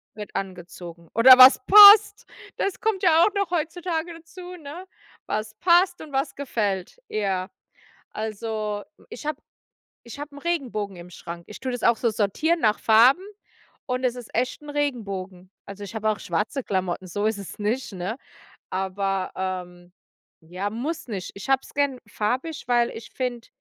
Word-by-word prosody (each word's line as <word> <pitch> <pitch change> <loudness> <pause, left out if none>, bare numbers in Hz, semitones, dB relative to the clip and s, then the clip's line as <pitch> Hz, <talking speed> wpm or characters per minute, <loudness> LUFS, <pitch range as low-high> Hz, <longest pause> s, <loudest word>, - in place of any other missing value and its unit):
Wird 210 -1 -9
angezogen. 175 -3 -8
Oder 255 +3 +8
was 255 +1 +9
passt, 415 +1 +9 0.3
das 395 - -2
kommt 425 -3 -1
ja 335 -2 +5
auch 420 - +2
noch 400 -3 -1
heutzutage 340 0 -3
dazu, 355 +2 -11
ne? 320 +3 -9 0.4
Was 215 0 -3
passt 355 +1 +3
und 300 -2 -11
was 270 +2 -1
gefällt, 210 - -3
ja. 195 -3 -2 0.6
Also, 215 -1 -4 0.3
ich 440 -9 -9
hab 305 -2 -2 0.7
ich 235 +4 -11
habe 290 0 -8
'n - - -9
Regenbogen 250 - -3
im 175 +1 -11
Schrank. 170 0 -9
Ich 210 - -10
tue 260 - -4
das 245 -2 -5
auch 235 -1 +4
so 235 - +1
sortieren 225 - 0
nach 215 -1 +2
Farben 245 +11 +5 0.6
und 255 0 -2
es 250 -1 0
ist 245 -3 -11
echt 250 +4 -1
'n 295 - -11
Regenbogen. 200 -11 -4
Also, 200 +1 -9
ich 205 +3 -9
habe 220 0 0
auch 215 - -1
schwarze 210 - -2
Klamotten, 185 -2 -3
so 205 +4 -3
ist 220 -2 -1
es 200 - -9
nicht, 215 +2 -2
ne? 190 +7 -4 0.5
Aber, 190 0 -2
ähm 180 -1 -6 0.5
ja, 180 +5 -5
muss 265 +10 -5
nicht. 195 -6 -5
Ich 200 +6 -9
habe 270 0 +3
es - - -15
gern 280 -3 0
farbig, 255 +10 -3
weil 240 -1 +2
ich 225 - -10
finde 245 -3 -4
230 Hz, 170 wpm, -24 LUFS, 195-290 Hz, 0.7 s, was